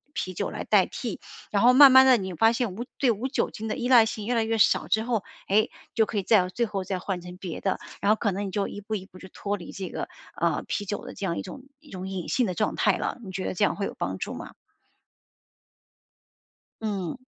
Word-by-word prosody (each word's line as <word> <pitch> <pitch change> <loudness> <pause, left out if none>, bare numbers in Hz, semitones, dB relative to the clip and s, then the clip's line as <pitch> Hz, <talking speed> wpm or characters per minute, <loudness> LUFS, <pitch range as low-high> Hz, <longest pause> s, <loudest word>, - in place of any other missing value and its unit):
啤 185 - -3
酒 - - -2
来 - - -5
代 - - +4
替， - - -5 0.3
然 200 - +2
后 245 - +8
慢 270 +1 +9
慢 260 0 +9
地 260 -2 +7
你 190 -3 -4
发 225 +7 +4
现 230 -5 -2
无 235 - -4
对 255 -4 +3
无 230 +5 -2
酒 - - 0
精 220 - -6
的 - - -2
依 245 -1 -2
赖 240 -3 +7
性 215 -1 -5
越 245 - 0
来 230 -2 +2
越 225 0 0
少 210 - +3
之 220 - +2
后， 230 -3 -1 0.2
哎， 210 +3 +3 0.2
就 220 - +3
可 215 - -4
以 200 - 0
再 185 -3 +4
最 235 +5 0
后 200 -3 -3
再 190 0 -3
换 185 -1 -3
成 180 +1 -10
别 180 -4 -6
的， 190 - 0 0.2
然 205 - +3
后 - - +5
可 210 -1 0
能 200 +2 -3
你 - - -6
就 200 +1 -1
一 205 - -7
步 215 +2 -4
一 190 -2 -5
步 190 -1 -16
就 190 - -11
脱 205 +3 -3
离 175 -4 -9
这 190 -2 -6
个， - - -5 0.3
呃， - - 0
啤 205 - -2
酒 205 +1 -4
的 - - -8
这 200 - -5
样 170 -3 -1
一 - - -2
种 275 - -9 0.2
一 300 -1 -19
种 185 0 -6
瘾 190 -3 -4
性 250 - +1
的 185 - -2
状 - - 0
态 - - +2
了， - - -3
你 190 - -8
觉 185 0 -4
得 - - -2
这 185 - 0
样 - - +2
会 200 - -2
有 - - -5
帮 95 +1 -3
助 - - -4
吗？ - - -8 2.3
嗯。 195 -7 -3
205 Hz, 285 characters per minute, -26 LUFS, 190-230 Hz, 2.3 s, 慢